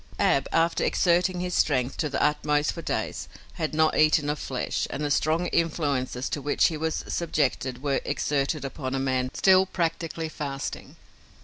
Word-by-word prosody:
Ab, 135 - +2
after 165 +1 +2
exerting 180 +1 +2
his 180 0 -3
strength 130 -5 +1
to 155 - -1
the 140 - -2
utmost 150 0 +1
for 170 - -7
days, - - -3 0.3
had 155 -1 -3
not 155 0 +3
eaten 155 -1 +3
of 150 - -4
flesh, 130 -2 -2
and 150 - -3
the 145 - -1
strong 160 +5 +1
influences 140 -6 -1
to 145 - -3
which 145 +5 +2
he 165 - -4
was 160 +1 -2
subjected 135 -5 -1
were 140 -2 0
exerted 140 +1 -1
upon 135 -1 -4
a - - 0
man 130 -1 0
still, 190 0 +5
practically, 165 -2 -2
fasting. 140 -3 -5
150 Hz, 170 wpm, -26 LUFS, 135-165 Hz, 0.3 s, still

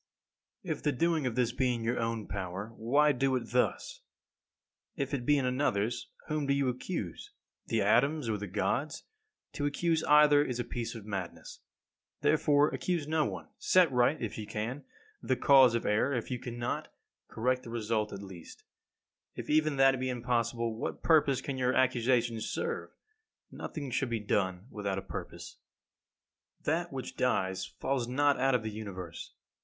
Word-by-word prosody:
17. 180 - -4
If - - -19
the 150 - +2
doing 160 0 +1
of 120 - -3
this 125 -2 +2
be 125 0 +1
in 115 - -5
your 120 +2 0
own 115 -2 -2
power, 95 +3 -5
why 145 +7 +3
do 135 0 +1
it 125 -2 -4
thus? 315 - 0 0.9
If 140 -3 -3
it 125 -3 -2
be 145 - +5
in 135 - 0
another's, 120 -4 0 0.2
whom 150 -2 -2
do 140 - +3
you 140 -2 +1
accuse? 125 - -5 0.4
The - - +1
atoms 140 +1 +3
or 105 -2 -1
the 105 - -5
Gods? 120 +9 -1 0.5
To 145 -2 -1
accuse 160 +2 0
either 150 -1 +6
is 125 -4 -3
a - - 0
piece 120 -1 -5
of 110 -3 -8
madness. 95 -4 -6 0.6
Therefore 145 0 +4
accuse 170 -5 -2
no 155 -1 +2
one. - - -6
Set 180 -5 +4
right, 125 +4 +3
if 110 -1 -4
you 105 - -6
can, 115 +8 -4 0.4
the 130 - +1
cause 130 -3 +6
of 115 - -1
error; 110 +7 +2
if 120 +1 -3
you 125 - -2
cannot, 120 -1 -4 0.4
correct 125 +3 0
the 120 - -10
result 110 -2 -1
at 100 - -7
least. 95 -4 -11 0.7
If - - -5
even 155 -1 +3
that 135 -1 +4
be 130 0 -1
impossible, 115 -2 -1
what - - -4
purpose 145 -5 +4
can 135 -2 -4
your 125 0 +1
accusations 120 -3 +2
serve? 470 -1 -3 0.6
Nothing 140 -4 -6
should 135 0 0
be 115 -1 -1
done 95 -2 -1
without 100 -2 -3
a 95 - -4
purpose. - - -8 1.0
18. - - +1
That - - -2
which - - -6
dies 95 0 0
falls 130 -3 -2
not 145 +3 +2
out 135 -1 +3
of 120 - 0
the 110 - -3
Universe. 95 -6 -7
125 Hz, 175 wpm, -31 LUFS, 110-140 Hz, 1.0 s, either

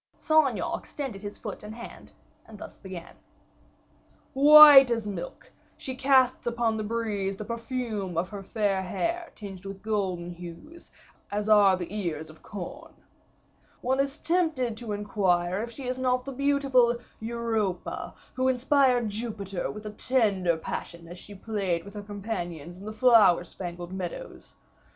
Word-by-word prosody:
Saint 315 -2 +4
Aignan 235 - -3
extended 265 -9 -6
his 205 0 -7
foot - - -7
and 210 +1 -9
hand, 240 0 -11 0.4
and 220 - -12
thus - - -11
began: 185 -3 -9 1.2
"White 290 -1 +10
as 230 -2 -1
milk, 185 -4 -7 0.3
she 260 - -6
casts 260 -2 +3
upon 235 -1 0
the 215 - -3
breeze 210 -3 -2
the 210 - -6
perfume 230 -5 -4
of 180 +2 0
her 200 -1 -6
fair 195 -1 -1
hair 335 - -3
tinged 195 -3 -9
with 195 0 -8
golden 190 -5 -2
hues, 175 - -11 0.4
as 205 +1 -2
are 200 -3 +6
the 180 +2 -6
ears 160 -6 -4
of 155 - -19
corn. 275 - -8 0.9
One 265 +2 0
is 275 +1 0
tempted 315 -10 0
to 230 -2 -6
inquire 190 -3 0
if 235 - -4
she 255 +3 -9
is 255 +1 -2
not 255 -1 +1
the 275 - -5
beautiful 270 -3 +2 0.2
Europa, 225 -4 -3 0.2
who 260 0 0
inspired 255 -2 +3
Jupiter 205 -4 -4
with 210 0 -8
a 210 - -5
tender 205 -8 +1
passion 170 +1 -6
as 175 +1 -10
she 205 - -12
played 195 -4 -2
with 200 - -11
her 210 - -6
companions 185 -6 -6
in 190 +3 -12
the 215 - -5
flower 215 -6 +5
spangled 175 0 -7
meadows. 180 -3 -7
215 Hz, 155 wpm, -27 LUFS, 190-255 Hz, 1.2 s, White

